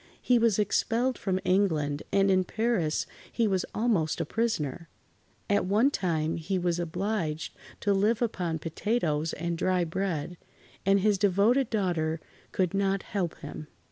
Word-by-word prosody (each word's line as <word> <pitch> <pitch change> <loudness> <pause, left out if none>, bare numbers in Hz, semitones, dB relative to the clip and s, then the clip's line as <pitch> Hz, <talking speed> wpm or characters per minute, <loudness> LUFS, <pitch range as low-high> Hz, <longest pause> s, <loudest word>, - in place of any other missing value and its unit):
He 245 -1 +3
was 230 -3 +3
expelled 230 +4 +1
from 190 -2 0
England, 155 -7 +1
and 195 0 +3
in 185 0 +4
Paris 220 -6 0 0.3
he 230 - +1
was 190 -2 0
almost 210 -9 +1
a - - 0
prisoner. 170 - -2 0.6
At 205 -1 +2
one 220 +8 +3
time 160 - -1
he 175 +4 -2
was 175 -1 0
obliged 175 -2 -2 0.3
to 205 - +2
live 210 +3 +2
upon 180 -8 -1
potatoes 165 -2 -1
and 170 +1 -3
dry 185 -1 +2
bread, 170 -1 -3 0.5
and 195 0 +5
his 205 -1 +2
devoted 210 +7 +3
daughter 170 -7 0 0.3
could 185 -2 0
not 195 0 +1
help 180 -5 -3
him. 155 - -7
190 Hz, 145 wpm, -28 LUFS, 165-210 Hz, 0.6 s, and